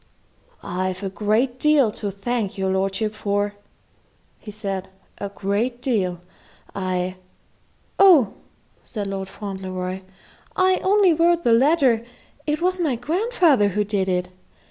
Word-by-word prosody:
"I've 185 +2 -3
a 195 - -3
great 220 +6 0
deal 290 -7 +4
to 205 0 -4
thank 200 +1 -3
your 190 0 0
lordship 195 +3 0
for," 205 -1 -1 0.9
he - - -11
said; 195 -3 -4 0.3
"a 200 - -4
great 205 +5 -2
deal. 190 -9 -1 0.5
I 185 -1 -2 0.4
" - - -39
"Oh," 345 - +6 0.5
said 205 -4 -5
Fauntleroy; 190 -2 -5 0.5
"I 370 0 +3
only 390 -2 +4
wrote 340 +1 +3
the 235 - +4
letter. 260 -2 +4 0.4
It 305 +3 -1
was 370 +1 +1
my 305 -7 +1
grandfather 320 - +2
who 205 +1 0
did 200 -2 -1
it. 180 0 -1
210 Hz, 125 wpm, -22 LUFS, 195-280 Hz, 0.9 s, Oh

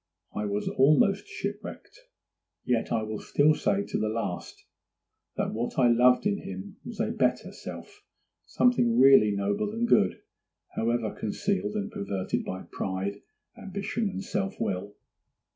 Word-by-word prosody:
I 105 - -2
was 100 +1 -2
almost 155 - +3
shipwrecked; - - -7 0.6
yet 120 -2 0
I 110 - +1
will 110 0 -4
still 150 +2 +3
say 195 +5 0
to - - -3
the 110 - 0
last 110 -5 -4 0.7
that - - -1
what 115 +2 -3
I 125 -2 +5
loved 125 - +5
in 205 0 +1
him 95 +1 -8
was - - -8
a - - 0
better - - 0
self—something 120 - -2
really 135 -4 +7
noble 100 - -1
and 235 +1 0
good, 95 - +3 0.5
however 115 -1 0
concealed 205 - -2
and 210 0 -2
perverted 200 - -2
by 95 0 -5
pride, 95 +2 -3 0.3
ambition, 200 +3 -3
and 200 - -5
self 195 0 -3
will. 100 +2 -3
125 Hz, 140 wpm, -28 LUFS, -, 0.7 s, really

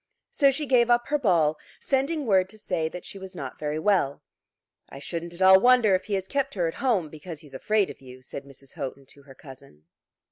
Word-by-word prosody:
So 280 -2 +4
she 275 +3 -1
gave 245 -3 +3
up 240 0 +3
her 295 0 +1
ball, 165 - +2 0.2
sending 280 +3 -1
word 190 -4 +3
to 215 - -13
say 175 -6 -2
that 180 +1 -9
she 195 - -9
was 190 -1 -10
not 135 -6 -7
very 150 0 -2
well. 160 -5 +1 0.7
"I - - -10
shouldn't 170 +4 -5
at 185 - -1
all 190 0 +8
wonder 245 -3 +5
if 185 - +1
he 205 - -1
has 190 -1 -2
kept 280 -2 -2
her 175 -3 0
at 165 - -3
home 225 -11 +1
because 155 +1 -9
he's 145 -3 -16
afraid 205 +8 0
of - - -15
you," 130 -1 -13
said 135 - -8
Mrs. 140 0 -14
Houghton 135 0 -6
to 140 - -17
her 135 -1 -16
cousin. 130 - -15
180 Hz, 225 wpm, -26 LUFS, 145-230 Hz, 0.7 s, all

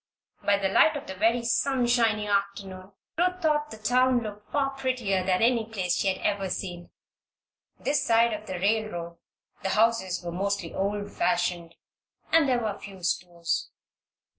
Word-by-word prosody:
By 200 0 +3
the 195 -1 0
light 310 +11 +4
of 280 - -8
the 190 - -6
very 225 +5 +2
sunshiny 240 -4 +2
afternoon 200 -1 -2 0.3
Ruth 365 +1 +1
thought 300 -3 +1
the 220 - -9
town 250 +3 +2
looked 210 -1 -9
far 275 -1 +1
prettier 255 -8 -1
than 185 +2 +1
any 235 -1 +3
place 190 -5 -2
she - - 0
had 190 -1 +1
ever 200 -2 0
seen. 175 -2 -5 0.9
This 285 +2 0
side 230 0 +3
of 215 - -6
the 185 - -4
railroad 180 -4 -1 0.4
the 190 - -2
houses 210 -5 +1
were 170 - -3
mostly 195 -1 -2
old 205 +1 -2
fashioned, 175 -7 -1 0.6
and 320 -4 +5
there 245 -2 +1
were 210 -2 -3
few 195 -2 -11
stores. 170 -1 -1
205 Hz, 160 wpm, -27 LUFS, 190-240 Hz, 0.9 s, and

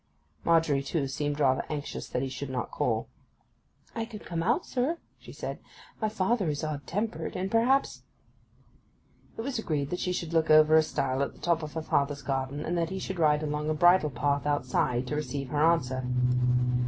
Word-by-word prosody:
Margery, 165 -4 +3
too, 140 +1 -1
seemed 145 +2 -2
rather 130 -3 +3
anxious 150 -2 -5
that 125 - -1
he - - -1
should 130 +1 -5
not 125 -3 -3
call. - - 0 0.9
'I 225 -1 -2
could 220 -2 -10
come 170 -2 -2
out, 235 - +1
sir,' 275 +7 -1 0.2
she - - -12
said. - - -5 0.4
'My 215 - +1
father 205 -2 +1
is 145 0 -2
odd 150 -2 -4
tempered, 215 +5 -3
and 190 +2 -2
perhaps—' 250 +4 +2 1.4
It - - -3
was 255 0 -2
agreed 145 -8 -2
that 180 - -2
she 180 - -1
should 170 -2 -3
look 160 -1 +2
over 155 0 +7
a 160 - +8
stile 135 -3 -1
at 140 - -1
the - - -18
top 170 -1 +1
of 155 -1 -6
her 160 - -3
father's 145 -2 0
garden, 135 +2 -2
and 175 - -1
that 165 -1 0
he 190 - -4
should 190 -1 -4
ride 150 -1 +3
along 150 0 -2
a 155 - +1
bridle 175 0 +5
path 140 +2 0
outside, 130 -3 +1
to 150 - -3
receive 145 -3 -3
her 150 +2 +1
answer. 130 -6 +2
155 Hz, 195 wpm, -28 LUFS, 140-180 Hz, 1.4 s, a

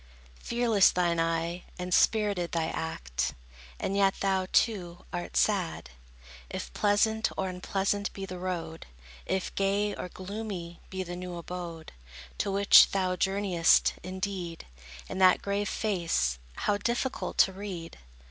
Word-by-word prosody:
Fearless 235 -5 +3
thine 175 -2 +1
eye, 165 +1 -1
and 180 0 -3
spirited 205 -6 +2
thy 165 -1 0
act; 65 - -3 0.4
And 195 - -2
yet 195 -1 +3
thou, 190 -1 +1
too, 180 -6 +1
art 175 0 -3
sad. 185 - +1 0.6
If - - -6
pleasant 220 +2 +2
or 190 - 0
unpleasant 195 +2 -1
be 195 - -6
the 185 -1 -7
road, 170 -3 -4 0.4
If 190 -1 -1
gay 200 +1 +1
or 180 - -6
gloomy 185 -3 -6
be 190 0 -3
the 175 0 -6
new 180 0 -6
abode, 170 -1 -7 0.5
To - - 0
which 200 +1 +7
thou 185 -2 0
journeyest, 190 -3 +3
indeed, 185 -2 -4 0.4
In 185 - -5
that 185 -1 +5
grave 200 0 -1
face, 165 - 0 0.2
how 205 - 0
difficult 240 +4 -2
to 190 - +5
read! 185 -4 -7
185 Hz, 135 wpm, -29 LUFS, 170-200 Hz, 0.6 s, which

